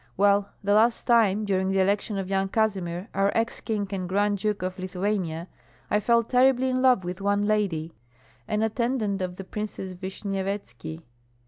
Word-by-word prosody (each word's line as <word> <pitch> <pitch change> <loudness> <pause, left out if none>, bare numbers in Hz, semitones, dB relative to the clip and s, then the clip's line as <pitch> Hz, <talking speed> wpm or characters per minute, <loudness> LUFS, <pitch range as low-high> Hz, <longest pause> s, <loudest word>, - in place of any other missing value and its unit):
Well, 200 +1 +3
the 205 +1 +2
last 225 +3 +3
time, 215 -3 +3
during 190 -1 +1
the 195 0 +1
election 200 +2 +1
of 195 -1 -3
Yan 195 0 0
Kazimir, 190 -4 -1
our 195 +1 +2
ex 225 0 0
king 210 -2 -1
and 185 -3 -3
Grand 205 +1 +1
Duke 210 -1 -1
of 185 +1 -4
Lithuania, 185 -3 -2 0.4
I 210 - +4
fell 235 +2 +3
terribly 260 +2 +3
in 255 0 0
love 255 -7 +4
with 180 +1 -5
one 200 +1 +1
lady, 185 -7 0 0.5
an 215 +1 0
attendant 220 -3 0
of 180 -1 -3
the 195 - -7
Princess 195 -1 -5
Vishnyevetski. 190 - -5
200 Hz, 165 wpm, -26 LUFS, 185-215 Hz, 0.5 s, I